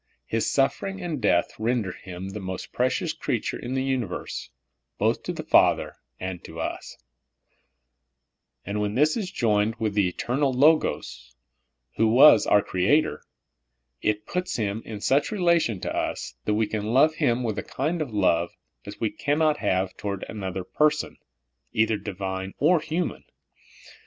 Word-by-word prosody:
His 115 0 0
suffering 195 +8 0
and 170 -7 -4
death 90 -4 +2
render 110 -3 0
Him 95 +1 -8
the 100 +2 -6
most 95 -1 -6
precious 155 +7 0
creature 125 -8 -2
in 125 +2 -4
the 130 - 0
universe, 130 -8 -3 0.5
both - - +1
to - - -5
Father - - +3 0.2
and 90 -1 -5
to 80 +1 -9
us; - - -5 1.7
and 105 +2 -2
when 105 0 -1
this 150 +4 +3
is 205 -5 -3
joined 110 - +1
w4th 110 -2 -1
the 100 -2 +3
eternal 130 +9 0
Logos, 125 - +1 0.6
who 115 - +4
was 120 +1 +7
our 105 - +5
Creator, 100 +13 +1 0.8
it 105 0 0
puts 180 +1 -3
Him 105 -1 -2
in 105 -2 -7
such 140 - +2
relation 170 - +2
to - - -3
us - - -3
that 105 - +1
we 110 +1 +2
can 110 +2 -3
love 155 +4 +5
Him 125 -6 +1
with 110 -3 -2
a - - -2
kind 155 +5 -2
of 145 -6 -3
love 85 -5 +1 0.3
as 100 0 -9
we 110 - 0
cannot 150 +1 +1
have 95 -4 0
toward 100 -2 -4
another 95 -3 -4
person, 150 +9 0 0.6
either 110 0 +2
divine 95 -1 -5
or 165 +4 +4
human. 165 +3 -3
110 Hz, 150 wpm, -25 LUFS, 100-145 Hz, 1.7 s, was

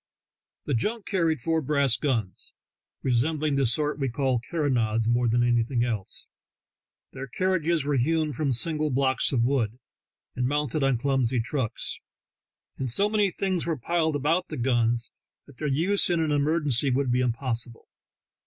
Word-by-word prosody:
The 145 - -1
junk 210 - -1
carried 165 - 0
four 160 +4 0
brass 140 -3 +2
guns, 115 -10 -3 0.5
resembling 145 +4 +1
the 140 -2 +2
sort 150 +5 0
we 135 -2 0
call 130 -1 0
carronades 115 -7 0
more 120 +1 +2
than 120 +1 +2
anything 120 0 +1
else; 110 -6 -4 0.9
their 135 0 -7
carriages 170 -1 0
were 145 -1 +1
hewn 155 +3 +1
from 140 +2 -1
single 155 +5 +1
blocks 130 0 +1
of 120 -4 +2
wood, 120 -3 0 0.6
and 125 0 0
mounted 145 0 -1
on 135 -2 +2
clumsy 130 -1 0
trucks, 120 0 -3 0.8
and 130 - -2
so 200 - +4
many 210 -2 +2
things 185 -2 -1
were 165 -2 -1
piled 160 +3 0
about 165 +6 0
the - - -6
guns 120 -1 0 0.3
that 140 -3 -17
their 150 - -2
use 170 +10 +2
in 175 -1 +1
an 160 -2 0
emergency 145 -3 +2
would 130 0 +1
be 125 - +2
impossible. 120 -1 -3
135 Hz, 155 wpm, -26 LUFS, 120-155 Hz, 0.9 s, so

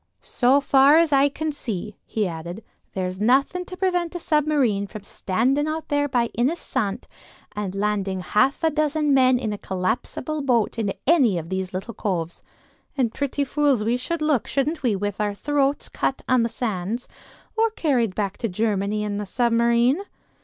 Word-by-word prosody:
"So 260 +3 +3
far 275 +2 +5
as 330 -2 +3
I 275 +1 +5
can 310 +2 -3
see," 210 -7 -5
he 215 -3 -1
added, 170 +4 -7 0.3
"there's 185 0 -3
nothing 275 - +2
to 365 - -9
prevent 360 -3 0
a - - -2
submarine 290 -11 +1
from 210 0 -9
standing 255 +10 0
out 315 +1 -4
there 290 -1 +1
by 240 -3 +1
Ynys 260 +9 +1
Sant 210 -6 -3 0.5
and 200 -2 -3
landing 195 -2 -1
half 260 - +1
a 320 - +3
dozen 300 -1 +1
men 255 -1 +5
in 225 -4 -2
a 205 - -6
collapsible 195 +10 -2
boat 240 -4 +1
in 205 -3 0
any 265 - +4
of 165 0 -5
these 190 0 -3
little 195 +5 -5
coves. 175 -5 -3 0.6
And 240 -4 +1
pretty 285 0 -1
fools 280 -4 +1
we 235 +2 +2
should 305 +6 -3
look, 300 -6 +1
shouldn't 295 +4 -1
we, 240 -6 +1
with 205 +1 -3
our 205 -1 -1
throats 285 +3 0
cut 270 - -2
on 255 -2 +4
the 230 - +1
sands; 220 0 -3 0.5
or 450 0 +3
carried 255 - 0
back 200 -2 -2
to 230 - -1
Germany 210 +1 -1
in 205 -1 -2
the 205 -1 -4
submarine?" 235 - +2
240 Hz, 175 wpm, -23 LUFS, 205-290 Hz, 0.6 s, far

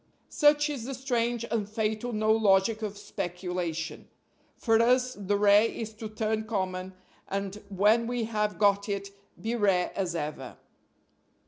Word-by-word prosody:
Such 295 0 +4
is 275 -6 -4
the 270 +1 -4
strange 240 -2 -1
and 210 -3 -1
fatal 220 +2 -2
no 215 -1 +1
logic 215 0 +3
of 210 -2 -4
speculation. 175 -3 -4 0.5
For 225 -1 +3
us 250 +2 +3
the 205 -1 -1
rare 205 +1 +6
is 220 -1 -6
to 215 0 -7
turn 220 0 -2
common, 185 -3 -3 0.3
and, 200 +1 -4
when 210 +4 +3
we 245 -1 -1
have 210 -3 -1
got 200 0 +3
it, 200 0 -3 0.3
be 230 +2 -2
rare 195 -5 +2
as 180 -3 -2
ever. 150 -5 -5
210 Hz, 145 wpm, -28 LUFS, 195-230 Hz, 0.5 s, rare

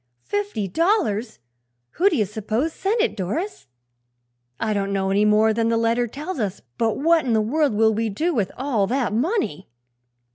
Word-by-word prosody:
"Fifty 205 - -2
dollars! 245 - 0 0.5
Who 385 +3 +3
do 350 - -1
you 215 - +2
s'pose 220 - -2
sent 430 +4 0
it, 465 - 0
Doris?" 310 - -4 0.9
"I 215 -1 0
don't 200 -1 -1
know 195 -1 0
any 205 +2 +3
more 215 +1 +4
than 230 +1 +1
the 230 - +2
letter 230 +1 +1
tells 295 +7 -6
us; 200 -3 -2 0.2
but 225 -2 +1
what 325 +2 +3
in 245 - 0
the 220 - +3
world 270 +3 +1
will 220 +1 +4
we 225 +1 -1
do 320 - -1
with 210 -8 0
all 250 -7 0
that 245 -3 0
money?" 245 - -1
225 Hz, 180 wpm, -23 LUFS, 210-305 Hz, 0.9 s, more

